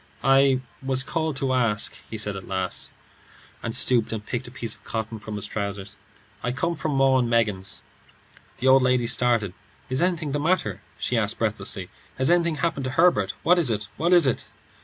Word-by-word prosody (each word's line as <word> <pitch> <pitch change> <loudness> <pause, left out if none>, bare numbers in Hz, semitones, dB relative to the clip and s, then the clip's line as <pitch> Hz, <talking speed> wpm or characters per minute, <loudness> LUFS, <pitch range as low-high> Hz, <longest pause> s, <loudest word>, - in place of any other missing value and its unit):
"I 135 -1 +4 0.2
was 130 -1 +1
asked - - -20 0.3
to 135 - -2
call," 125 -5 +2 0.3
he 110 - -5
said 105 -1 -2
at 95 - -8
last, 95 -1 -3 0.7
and 115 0 -3
stooped 125 -2 +3
and 110 -2 -4
picked 120 +1 -3
a - - -8
piece 115 -3 -3
of - - -18
cotton 110 0 -4
from 110 0 -7
his 105 - -3
trousers. 100 -1 -4 0.5
"I 125 - -1
come 170 +7 -1
from 155 -1 -2
'Maw 135 -1 +4
and 120 -2 0
Meggins.'" 105 -5 0 0.7
The 130 - -1
old 130 0 +7
lady 125 -1 +2
started. 115 -5 +2 0.4
"Is 130 - +2
anything 170 -4 0
the 145 - -1
matter?" 155 - 0 0.2
she - - 0
asked, - - -1
breathlessly. - - -2 0.3
"Has 130 +5 +3
anything 170 -2 +3
happened 155 -3 -1
to - - -1
Herbert? 165 - +3
What 180 +1 +5
is 160 -7 +4
it? 105 -2 -2
What 170 +2 +1
is 175 -4 +6
it?" 130 - -1
125 Hz, 195 wpm, -24 LUFS, 110-140 Hz, 0.7 s, old